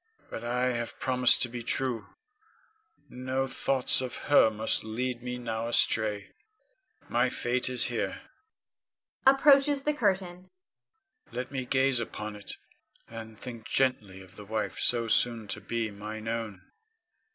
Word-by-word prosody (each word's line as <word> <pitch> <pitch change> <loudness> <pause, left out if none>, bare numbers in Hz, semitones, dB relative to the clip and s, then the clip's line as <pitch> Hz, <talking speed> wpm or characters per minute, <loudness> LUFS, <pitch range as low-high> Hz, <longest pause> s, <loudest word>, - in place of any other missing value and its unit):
But 115 - -6
I 125 +2 0
have 120 -1 -4
promised 125 -1 +4
to - - +1
be 120 0 -6
true, 125 0 -2 1.0
no 130 +1 -3
thoughts 130 0 +2
of 125 -2 -5 0.2
her 145 - +7
must 110 +1 0
lead 120 +2 -3
me 125 0 -5
now 115 -1 -4
astray. 110 -3 +3 0.8
My 120 +2 +1
fate 125 0 -1
is 125 -1 0
here - - -3 1.0
[approaches 275 +1 +5
the 300 - +1
curtain]. 190 -7 -1 0.8
Let 125 +2 -5
me 130 -2 -4
gaze 135 -1 +3
upon 105 -2 -5
it, 105 - -8 0.5
and 110 -1 -10
think 115 -3 -8
gently 105 -8 0
of 90 - -17
the 105 - -10
wife 110 +1 -3
so 120 -1 +1
soon 115 -1 +1
to - - -4
be 115 -2 -3
mine 110 +2 -7
own. 115 -5 -4
120 Hz, 140 wpm, -28 LUFS, 110-130 Hz, 1.0 s, her